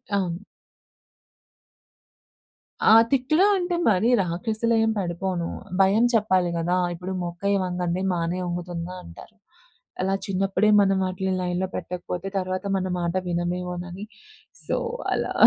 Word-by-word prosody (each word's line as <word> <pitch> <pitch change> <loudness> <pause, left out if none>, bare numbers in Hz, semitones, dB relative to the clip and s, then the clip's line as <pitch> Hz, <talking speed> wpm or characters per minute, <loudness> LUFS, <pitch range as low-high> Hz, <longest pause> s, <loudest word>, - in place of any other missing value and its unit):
అవును. 175 -3 0 2.5
ఆ! - - +7 0.2
తిట్లూ 285 +7 +3
అంటే 355 -1 -1
మరి 210 +4 +3
రాక్షసీలా 215 +7 -1
ఏం 225 - +2
పడిపోను. 175 -1 -2 0.3
భయం 200 +4 +4
చెప్పాలి 190 -5 +3
కదా! 170 +2 0 0.2
ఇప్పుడు 180 +2 -6
'మొక్కై 175 +4 -1
వంగది 180 0 -2
మానై 170 +1 -1
వంగుతుందా' 175 0 -4
అంటారు. 85 - -13 0.7
అలా 190 +1 +1
చిన్నప్పుడే 195 +2 +1
మనం 195 -1 +3
వాటిని 185 +1 -2
లైన్‌లో 180 +1 -1
పెట్టకపోతే 180 +1 -5
తర్వాత 185 0 -2
మన 185 -1 -1
మాట 170 -1 -1
వినమేమోనని 180 +2 -3 0.6
సో - - 0 0.4
అలా. - - -1
185 Hz, 115 wpm, -24 LUFS, 175-195 Hz, 2.5 s, ఆ